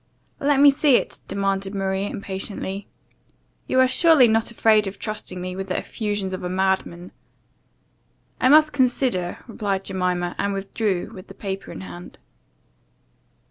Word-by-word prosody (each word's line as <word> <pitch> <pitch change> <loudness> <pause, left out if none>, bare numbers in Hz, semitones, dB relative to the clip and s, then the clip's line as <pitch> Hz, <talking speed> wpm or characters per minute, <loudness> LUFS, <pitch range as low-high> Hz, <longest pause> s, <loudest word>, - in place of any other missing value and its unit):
"Let 285 -1 +2
me 285 0 +8
see 280 -1 +3
it," - - -1
demanded 195 0 -2
Maria 195 +1 -1
impatiently, 195 0 -5 0.8
"You 260 0 +4
surely 300 +1 +6
are - - +2
not 225 0 +1
afraid 220 -2 +3
of 195 +1 -6
trusting 210 -4 -5
me 180 0 -5
with 190 0 -5
the 185 - -2
effusions 205 -4 -3
of 185 - -5
a 180 - -3
madman?" 185 -1 -1 1.3
"I 255 - +3
must 305 +1 +6
consider," 250 -9 +1
replied 200 -4 -2
Jemima; 180 -2 -1
and 200 0 0
withdrew, 195 -1 -2
with 185 -3 -11
the - - -12
paper 195 -1 -5
in - - -8
her 95 - -8
hand. 90 0 -11
195 Hz, 150 wpm, -23 LUFS, 190-230 Hz, 1.3 s, me